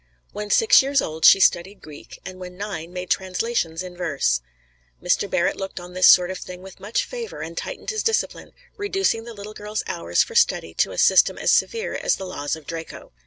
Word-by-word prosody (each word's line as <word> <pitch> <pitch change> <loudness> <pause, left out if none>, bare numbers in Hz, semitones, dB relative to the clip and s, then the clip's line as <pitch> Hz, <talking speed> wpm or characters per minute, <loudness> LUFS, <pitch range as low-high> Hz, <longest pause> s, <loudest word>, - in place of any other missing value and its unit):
When 210 0 -6
six 450 - +6
years 275 +1 +1
old 160 -5 -1
she - - +9
studied 190 +2 +2
Greek, 150 -2 -12
and 185 0 -8
when 180 0 -9
nine 185 -5 -6
made 180 0 -6
translations 185 -3 -1
in 180 -1 -9
verse. 140 - 0 0.6
Mr. - - 0
Barrett - - 0
looked 195 -1 -6
on 175 0 -11
this 185 0 +5
sort 180 0 +6
of 185 - -6
thing 180 0 -9
with 190 -1 -12
much 215 +4 -2
favor, 480 -2 -7
and - - -7
tightened - - -5
his 435 -1 -2
discipline, 450 - -1 0.2
reducing 390 - -1
the 235 - -8
little 205 +1 -9
girl's 210 0 -4
hours - - 0
for 465 - -10
study 470 0 +2
to - - 0
a - - -8
system - - +4
as - - +1
severe 460 +1 +1
as - - 0
the 190 - -7
laws 145 -6 -3
of 160 -2 -13
Draco. 165 +1 -8
190 Hz, 210 wpm, -22 LUFS, 175-230 Hz, 0.6 s, she